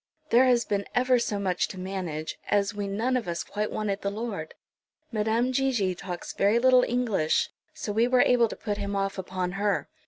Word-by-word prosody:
There 245 +3 +6
has 245 -2 +3
been 200 -1 -1
ever 250 0 +4
so 215 -3 -1
much 185 -3 0
to 185 - -8
manage, 180 -5 -4
as 200 +1 +2
we 205 -1 -3
none 225 +6 0
of 245 -5 -1
us 170 -1 -2
quite 210 +1 -3
wanted 205 -2 -2
the 200 - -1
Lord. 200 -6 -5 0.6
Madame 225 +3 +1
Gigi 250 -8 +1
talks 175 0 -6
very 205 +3 +3
little 255 +1 +6
English, 225 -10 +1 0.2
so 210 - -4
we 225 +3 +3
were 250 0 +4
able 240 -2 +4
to - - -7
put 205 -1 -4
him 200 0 -3
off 195 0 -1
upon 185 -1 -3
her." 205 -1 +1
205 Hz, 195 wpm, -27 LUFS, 195-240 Hz, 0.6 s, There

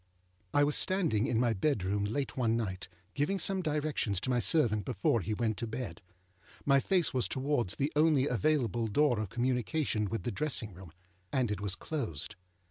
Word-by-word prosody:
I 145 - +4
was 145 0 +2
standing 160 - +1
in 115 - +1
my 120 -2 +2
bedroom 100 -3 0
late 135 +7 -2
one 115 -3 +1
night, 95 -5 -4 0.3
giving 150 +8 0
some 190 0 +1
directions 150 - -1
to 130 - -1
my 125 - +2
servant 115 -7 +3
before 100 +4 +1
he 105 +2 -2
went 110 -1 -1
to 115 - -3
bed. 110 -6 -5 0.6
My 140 -1 +5
face 180 +2 +2
was 130 -2 +2
towards 130 -7 -1
the 140 +2 -1
only 150 -3 +4
available 120 -2 +1
door 120 +2 +2
of 105 -3 -3
communication 125 - 0
with 115 - -3
the 120 - -2
dressing 120 -3 -2
room, 90 -2 -12 0.4
and 125 -5 +1
it 105 - -3
was 100 -2 -2
closed. 115 - -4
120 Hz, 180 wpm, -31 LUFS, 105-145 Hz, 0.6 s, My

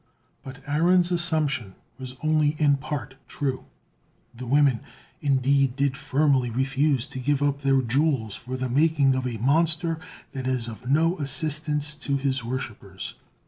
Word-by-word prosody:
But 135 0 -11
Aaron's 175 +4 +3
assumption 155 - 0 0.2
was 130 -1 -5
only 155 -1 +2
in 145 -2 +3
part 135 0 -5
true; 135 -3 -3 0.7
the 125 +1 -8
women 140 -2 +3 0.4
indeed 135 -2 +2
did 140 -1 0
firmly 140 -3 +1
refuse 135 +2 +1
to 135 -2 -7
give 145 +2 0
up 140 0 0
their 135 -1 +2
jewels 130 -3 0
for 130 +4 -6
the 130 0 -2
making 140 +1 +3
of 130 -1 -1
a 120 -2 -4
monster 160 +6 +2 0.3
that 130 -2 -5
is 125 -3 0
of 120 +2 -8
no 165 +5 +2
assistance 150 +1 0
to 140 -2 -2
his 135 -2 -1
worshippers. 110 -6 -6
140 Hz, 145 wpm, -25 LUFS, 130-150 Hz, 0.7 s, Aaron's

